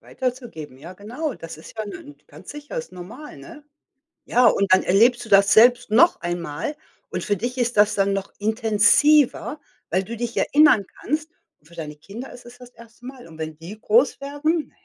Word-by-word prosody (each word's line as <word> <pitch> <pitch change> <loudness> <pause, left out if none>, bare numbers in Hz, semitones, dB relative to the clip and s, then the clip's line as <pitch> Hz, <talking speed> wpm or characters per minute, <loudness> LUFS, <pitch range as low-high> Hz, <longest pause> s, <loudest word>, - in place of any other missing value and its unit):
Weiterzugeben, 240 - -6
ja, 170 +6 -11
genau, 245 - -5
das 165 -2 -10
ist 160 - -14
ja 215 - -3
nen 145 -7 -10
ganz 155 +6 -13
sicher, 290 -1 -9
ist 160 +3 -6
normal, 220 +12 -10
ne? 325 -3 -13 0.6
Ja, 245 -2 +4
und 200 -2 +1
dann 185 - +4
erlebst 235 +7 +3
du - - -13
das 195 0 +5
selbst 245 0 +5
noch 335 +11 +4
einmal 175 - -4 0.3
und - - -4
für 205 -1 -1
dich 245 +5 -4
ist 240 -3 -1
das 210 0 +4
dann 195 0 +1
noch 195 0 -4
intensiver, 230 +8 +2 0.3
weil 185 +3 0
du 235 +5 -7
dich 240 0 -4
erinnern 290 -9 +4
kannst, 310 +4 -3 0.3
und 150 - -26
für 170 - -17
deine 150 -3 -7
Kinder 205 - -10
ist 245 - -14
es 240 +1 -14
das 250 -1 -14
1. 230 0 -18
Mal. 255 -4 -10
Und 160 -1 -14
wenn 155 -1 -6
die 180 +7 -10
groß 240 +6 +2
werden, 295 +3 -2
220 Hz, 195 wpm, -22 LUFS, 185-255 Hz, 0.6 s, das